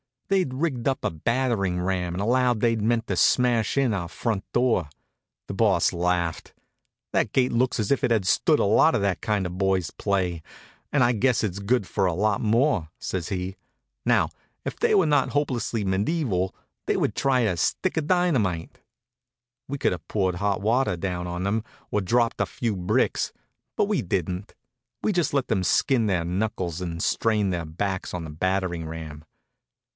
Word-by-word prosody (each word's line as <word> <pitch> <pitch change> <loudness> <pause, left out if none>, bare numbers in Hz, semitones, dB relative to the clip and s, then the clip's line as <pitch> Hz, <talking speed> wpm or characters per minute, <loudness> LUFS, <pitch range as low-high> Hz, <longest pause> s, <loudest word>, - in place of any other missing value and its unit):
They'd 185 -9 +1
rigged 135 -4 -1
up 135 -1 0
a - - 0
battering 100 0 0
ram 90 -1 -1
and 95 - -2
allowed 120 +1 +2
they 115 -1 +3
meant 115 +1 +1
to - - -1
smash 120 -2 +3
in 135 -5 +3
our 90 -4 -2
front 105 +2 -2
door. 120 - +2 0.6
The - - -5
Boss - - +3
laughed. 85 -1 -1 0.6
"That - - 0
gate 130 -1 +3
looks 120 0 +1
as 105 - -2
if 140 - +2
it - - +3
had 110 -5 +2
stood 90 - +3
a - - +1
lot - - +4
of - - +1
that 100 -2 0
kind 105 -4 0
of 90 0 -5
boy's 95 -3 +1
play, 95 -5 -1 0.5
and 140 -4 +3
I 120 - +4
guess 125 +1 +2
it's 100 -2 -2
good 105 +2 +1
for 95 +1 0
a 90 - +1
lot 105 +2 +1
more," 115 - +2
says 90 -4 -4
he. 95 0 -4 0.5
"Now, - - +3 0.4
if - - -5
they - - +3
were 190 -4 +5
not 145 -3 +2
hopelessly 125 -6 -1
medieval 95 - 0 0.3
they - - +2
would - - 0
try 135 -2 +2
a 105 -7 +1
stick - - 0
of 155 -2 0
dynamite." 130 - +1 0.9
We 140 - -3
could - - +1
have 90 -3 -6
poured 95 -4 0
hot 100 +1 -1
water 115 -1 +2
down 90 0 -3
on 90 +1 -4
them, 105 +3 0 0.3
or 105 - +2
dropped 115 +4 +1
a - - +3
few 115 -4 -2
bricks, 100 +8 0 0.4
but - - +2
we - - 0
didn't. 90 +2 -3 0.5
We - - +2
just 175 -8 0
let 140 -3 +1
them 100 -5 0
skin 120 +4 +2
their 90 -4 +1
knuckles 90 -2 -2
and 85 -2 -3
strain 105 -3 +1
their 85 -2 -2
backs 95 +4 -3
on 85 - -4
the 80 - -7
battering 90 0 -1
ram. 80 -2 -8
100 Hz, 185 wpm, -25 LUFS, 90-125 Hz, 0.9 s, were